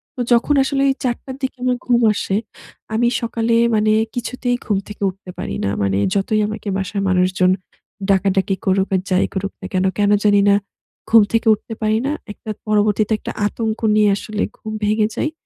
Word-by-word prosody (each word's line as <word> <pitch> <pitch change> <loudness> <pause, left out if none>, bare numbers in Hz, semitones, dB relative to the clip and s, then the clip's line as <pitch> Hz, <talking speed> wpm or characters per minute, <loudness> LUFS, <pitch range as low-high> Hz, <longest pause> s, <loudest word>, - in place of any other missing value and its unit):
তো 250 - -3
যখন 245 +5 +3
আসলে 275 0 0 0.2
৪ 245 -2 +1
টার 260 -1 -7
দিকে 260 - -2
আমার 250 -1 +1
ঘুম 240 -1 +3
আসে, 195 -1 -2 0.6
আমি 235 +2 +2
সকালে 230 0 0 0.2
মানে 215 0 +2 0.2
কিছুতেই 245 +1 -2
ঘুম 205 - +1
থেকে 210 - -10
উঠতে 185 0 -12
পারি - - -4
না। - - +1
মানে 95 0 +1 0.2
যতই 210 +2 +1
আমাকে 215 0 -6
বাসার 195 +1 -3
মানুষজন 185 0 +2 0.6
ডাকাডাকি 195 0 +2
করুক 190 0 +2
আর 185 - +1
যাই 185 0 +3
করুক 195 0 -3
না - - -7
কেন, 185 0 +1
কেন 205 0 +3
জানি 205 -1 +5
না 200 - +6 0.5
ঘুম 225 -2 +7
থেকে 230 0 +1
উঠতে 220 +2 -6
পারি 215 +1 +2
না। 290 - 0 0.2
একটা 215 - -7 0.2
পরবর্তীতে 210 0 +2
একটা - - -6 0.2
আতঙ্ক 220 0 -3 0.2
নিয়ে 210 -1 +4
আসলে 215 0 -4 0.2
ঘুম 215 - -7
ভেঙে 215 0 +2
যায় 305 - -1
210 Hz, 180 wpm, -19 LUFS, 195-230 Hz, 0.6 s, ঘুম